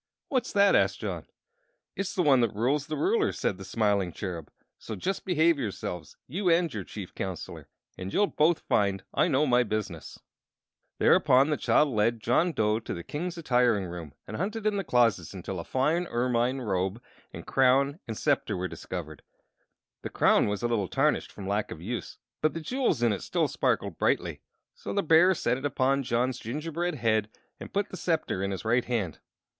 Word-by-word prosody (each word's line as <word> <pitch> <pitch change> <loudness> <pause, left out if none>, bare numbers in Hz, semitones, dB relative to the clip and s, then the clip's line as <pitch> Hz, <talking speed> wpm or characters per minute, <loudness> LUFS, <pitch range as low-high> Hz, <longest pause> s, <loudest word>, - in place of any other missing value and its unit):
"What's 255 -3 0
that?" 200 -1 +5
asked - - +2
John. - - -5 0.7
"It's 195 +1 -3
the 180 - +2
one 135 -5 +5
that 115 -4 0
rules 135 +7 0
the 155 - -3
ruler," 420 +3 +2
said 95 - -2
the - - -7
smiling 100 -2 0
Cherub. 85 -4 -6 0.3
"So - - -6
just 195 +2 -3
behave 170 -3 +3
yourselves 95 - -5
you 180 +6 -1
and 165 -3 +3
your 105 - -4
Chief 95 0 -8
Counselor 95 -3 -6 0.3
and 95 +1 -5
you'll 205 - +3
both 165 -3 +2
find 100 -2 +1
I - - +3
know 150 -2 +2
my 125 -3 +4
business." 105 -7 -4 0.8
Thereupon 135 +4 +4
the - - +3
child 150 +1 +3
led 115 0 +1
John 125 +11 +2
Dough 110 -6 +1
to 115 - -5
the 85 - -7
King's 170 - -4
attiring 125 - +2
room, 85 -5 -8
and 110 - -5
hunted 210 +5 -3
in 215 -1 +2
the 195 - -1
closets 120 - +2
until 95 0 -5
a - - -4
fine 155 - 0
ermine 125 +1 0
robe 95 -1 -1 0.3
and - - -8
a - - -25
crown 135 +3 +3
and 110 -2 -5
scepter 135 -8 0
were 90 +1 -2
discovered. - - -7 0.8
The - - -5
crown - - +3
was 105 +2 -2
a - - +2
little 110 -5 0
tarnished - - +1
from 95 - -8
lack 100 +1 -1
of - - -7
use, 115 +8 -5 0.2
but 155 +1 +1
the - - -2
jewels 245 - 0
in 115 -3 +4
it 100 - -4
still - - 0
sparkled - - -1
brightly; - - 0 0.3
so - - -6
the 200 - +1
bear 165 +4 +5
set 125 -4 0
it 140 - -6
upon 135 0 +1
John's 125 0 0
gingerbread 160 +8 -3
head 110 -4 +1 0.3
and - - -9
put 200 +1 -1
the 185 - -7
scepter 160 - -1
in 100 - -1
his 95 +2 -5
right 120 +2 +2
hand. 110 -10 -2
125 Hz, 195 wpm, -28 LUFS, 105-160 Hz, 0.8 s, that